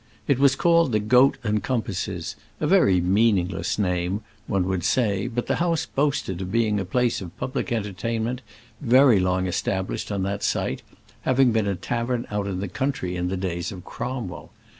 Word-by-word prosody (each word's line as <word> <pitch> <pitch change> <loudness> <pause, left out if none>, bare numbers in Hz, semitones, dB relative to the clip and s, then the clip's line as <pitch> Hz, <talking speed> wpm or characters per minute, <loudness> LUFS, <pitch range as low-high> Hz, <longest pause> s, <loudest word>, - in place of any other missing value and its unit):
It 135 -2 +2
was 140 -1 +5
called 170 -3 +3
the 105 - +3
"Goat 125 +6 +4
and 105 -1 0
Compasses," 95 -6 -3 0.2
a - - -1
very 150 - +4
meaningless 95 0 +1
name, 90 0 0 0.3
one 95 -2 +1
would 95 -2 -1
say; 105 -2 +1
but 120 0 -3
the - - 0
house 170 -2 0
boasted 135 -10 -1
of 95 0 -5
being 110 -2 +2
a 95 - -2
place 120 +5 0
of 90 -2 -9
public 135 0 -3
entertainment 115 +3 -2 0.4
very 130 -4 +5
long 90 0 +1
established 95 +3 -2
on 100 -2 -1
that 100 +1 -2
site, - - -1 0.4
having 130 -1 +3
been 110 -2 +1
a 100 - 0
tavern 120 +4 -2
out 105 -1 -1
in 95 -1 -3
the 100 - -2
country 95 -5 -2
in 90 0 -1
the 95 +1 -2
days 90 -1 -3
of 90 -3 -9
Cromwell. 120 -9 -5
105 Hz, 180 wpm, -24 LUFS, 95-125 Hz, 0.4 s, was